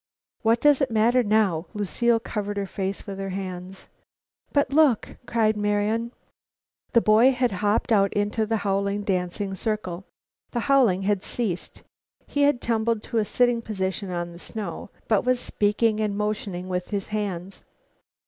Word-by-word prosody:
"What 230 Hz, +1 st, +3 dB
does 295 Hz, -1 st, +5 dB
it 270 Hz, -, +2 dB
matter 230 Hz, +3 st, +3 dB
now?" 205 Hz, -7 st, +1 dB
Lucile 230 Hz, +3 st, +1 dB
covered 205 Hz, -2 st, -4 dB
her 200 Hz, -, -1 dB
face 195 Hz, 0 st, -4 dB
with 195 Hz, -2 st, -6 dB
her 195 Hz, 0 st, -3 dB
hands. 185 Hz, 0 st, -6 dB, 0.6 s
"But 285 Hz, -2 st, +1 dB
look!" 290 Hz, -7 st, +3 dB
cried 220 Hz, -2 st, +2 dB
Marian. 210 Hz, +3 st, 0 dB, 0.8 s
The 235 Hz, -, +6 dB
boy 225 Hz, +5 st, +5 dB
had 250 Hz, -2 st, +1 dB
hopped 205 Hz, +4 st, 0 dB
out 200 Hz, -3 st, +4 dB
into 210 Hz, +2 st, 0 dB
the 225 Hz, 0 st, +1 dB
howling, 200 Hz, +1 st, 0 dB
dancing 190 Hz, 0 st, -2 dB
circle. 195 Hz, -2 st, -3 dB, 0.5 s
The 240 Hz, -, 0 dB
howling 235 Hz, -9 st, +3 dB
had 200 Hz, -1 st, +1 dB
ceased. 200 Hz, -8 st, -4 dB, 0.4 s
He 285 Hz, -, -2 dB
had 285 Hz, -3 st, +3 dB
tumbled 225 Hz, -1 st, 0 dB
to 230 Hz, -, -1 dB
a 215 Hz, -, +1 dB
sitting 245 Hz, +1 st, +2 dB
position 195 Hz, -2 st, -3 dB
on 175 Hz, -1 st, -3 dB
the 170 Hz, -, -12 dB
snow, 200 Hz, -4 st, -6 dB, 0.2 s
but 215 Hz, -3 st, +2 dB
was 250 Hz, 0 st, +2 dB
speaking 215 Hz, -1 st, +1 dB
and 210 Hz, -2 st, -1 dB
motioning 205 Hz, -3 st, -3 dB
with 180 Hz, -1 st, -2 dB
his 200 Hz, -2 st, -3 dB
hands. 195 Hz, -3 st, -4 dB
210 Hz, 160 wpm, -25 LUFS, 195-230 Hz, 0.8 s, The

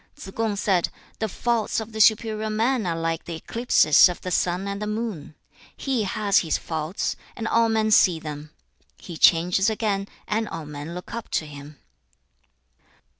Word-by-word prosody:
Tsze 195 Hz, -, -9 dB
kung 225 Hz, -2 st, -1 dB
said, 195 Hz, -3 st, +1 dB, 0.3 s
'The 220 Hz, -, 0 dB
faults 230 Hz, +2 st, -1 dB
of 220 Hz, 0 st, -7 dB
the 220 Hz, 0 st, -1 dB
superior 220 Hz, 0 st, +3 dB
man 225 Hz, 0 st, 0 dB
are 165 Hz, -, -1 dB
like 165 Hz, 0 st, -2 dB
the 170 Hz, -, -5 dB
eclipses 170 Hz, -4 st, +4 dB
of 180 Hz, -, -5 dB
the 185 Hz, -, -5 dB
sun 180 Hz, +2 st, 0 dB
and 200 Hz, 0 st, -4 dB
moon. 210 Hz, -9 st, -4 dB, 0.4 s
He 255 Hz, -6 st, -1 dB
has 200 Hz, 0 st, +2 dB
his 165 Hz, -, 0 dB
faults, 160 Hz, +3 st, -3 dB, 0.2 s
and 225 Hz, -, -4 dB
all 230 Hz, 0 st, +3 dB
men 220 Hz, -1 st, +1 dB
see 180 Hz, -5 st, +5 dB
them; 150 Hz, -1 st, -7 dB, 0.5 s
he 175 Hz, -, -9 dB
changes 175 Hz, +5 st, +4 dB
again, 205 Hz, -3 st, -1 dB, 0.2 s
and 220 Hz, +1 st, -1 dB
all 165 Hz, -2 st, -6 dB
men 150 Hz, +3 st, -7 dB
look 180 Hz, -, -8 dB
up 230 Hz, -1 st, -6 dB
to 155 Hz, -, -3 dB
him.' 145 Hz, 0 st, -11 dB
195 Hz, 170 wpm, -24 LUFS, 165-220 Hz, 0.5 s, see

